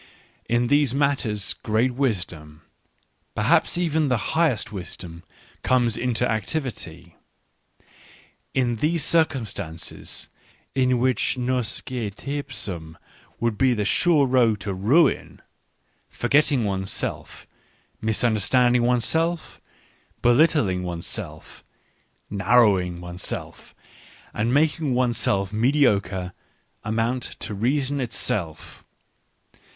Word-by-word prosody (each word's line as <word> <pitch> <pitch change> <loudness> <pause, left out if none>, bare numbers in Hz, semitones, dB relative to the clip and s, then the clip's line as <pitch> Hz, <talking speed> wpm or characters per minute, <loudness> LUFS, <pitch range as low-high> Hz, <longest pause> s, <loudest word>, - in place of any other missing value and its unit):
In 120 +1 +2
these 145 0 +2
matters 135 -8 0
great 115 +2 +1
wisdom, 90 - -3 0.7
perhaps - - +2
even 160 -3 +1
the 125 -4 -1
highest 155 -10 +1
wisdom, 90 -3 -8 0.4
comes 120 -3 +2
into 125 -1 0
activity: 105 - -4 1.4
in 120 -3 +1
these 155 +5 0
cir 165 -1 +4
cumstances, 100 - -6 0.5
in 130 -1 +2
which 130 +1 +1
nosce 125 -2 -1
teipsum 105 - -5 0.4
would 115 -2 -1
be 130 -2 +4
the 105 -2 -1
sure 155 - +3
road 120 -5 +3
to 100 - -3
ruin, 130 - +2 0.7
forgetting 140 -4 +2
one's 95 -1 -2
self, - - -4 0.6
misunder 110 0 +1
standing 125 +2 +3
one's 120 -1 +2
self, 160 -9 -1 0.6
belittling 120 - +3
one's 85 -2 -4
self, - - -7 0.6
narrowing 100 -5 +3
one's 90 0 -8
self, - - -5 0.6
and 115 +3 0
making 150 -1 +2
one's 125 -2 +1
self 100 +1 0
mediocre, 105 -7 +1 0.5
amount 115 +4 0 0.2
to - - -5
reason 135 +6 0
itself. 100 -8 -3
120 Hz, 100 wpm, -24 LUFS, 100-135 Hz, 1.4 s, cir